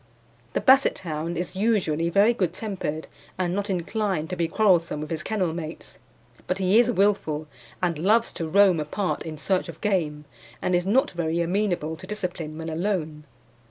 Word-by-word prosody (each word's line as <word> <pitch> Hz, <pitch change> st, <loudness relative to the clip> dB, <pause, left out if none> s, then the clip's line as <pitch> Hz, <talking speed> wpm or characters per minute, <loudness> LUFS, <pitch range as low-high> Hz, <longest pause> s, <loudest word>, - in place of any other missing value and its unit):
The -, -, 0 dB
Basset 270 Hz, +1 st, +5 dB
hound 165 Hz, 0 st, -4 dB
is 180 Hz, +2 st, -4 dB
usually 185 Hz, -6 st, +1 dB
very 200 Hz, +6 st, +4 dB
good 185 Hz, -7 st, -1 dB
tempered 185 Hz, -7 st, -4 dB, 0.3 s
and 180 Hz, -1 st, 0 dB
not 205 Hz, +2 st, -2 dB
inclined 185 Hz, -2 st, -1 dB
to -, -, -1 dB
be 170 Hz, -2 st, 0 dB
quarrelsome 175 Hz, -4 st, +2 dB
with 150 Hz, +1 st, -6 dB
his 160 Hz, -1 st, -2 dB
kennel 185 Hz, -6 st, -1 dB
mates; 165 Hz, -1 st, -7 dB, 0.5 s
but 180 Hz, -, 0 dB
he 195 Hz, +3 st, +4 dB
is 240 Hz, 0 st, +4 dB
wilful, 195 Hz, -8 st, +1 dB, 0.4 s
and 170 Hz, -4 st, 0 dB
loves 220 Hz, +7 st, +3 dB
to 165 Hz, -, -4 dB
roam 190 Hz, 0 st, +5 dB
apart 180 Hz, +6 st, -2 dB
in 155 Hz, -1 st, -6 dB
search 185 Hz, +3 st, 0 dB
of 165 Hz, -1 st, -9 dB
game, 155 Hz, -7 st, -1 dB, 0.3 s
and 185 Hz, -, -1 dB
is 175 Hz, +1 st, +1 dB
not 250 Hz, +7 st, +3 dB
very 170 Hz, -1 st, -1 dB
amenable 175 Hz, -3 st, 0 dB
to 185 Hz, -, -11 dB
discipline 175 Hz, -6 st, -4 dB
when 160 Hz, 0 st, -6 dB
alone. 160 Hz, -3 st, -2 dB
180 Hz, 175 wpm, -25 LUFS, 160-200 Hz, 0.5 s, Basset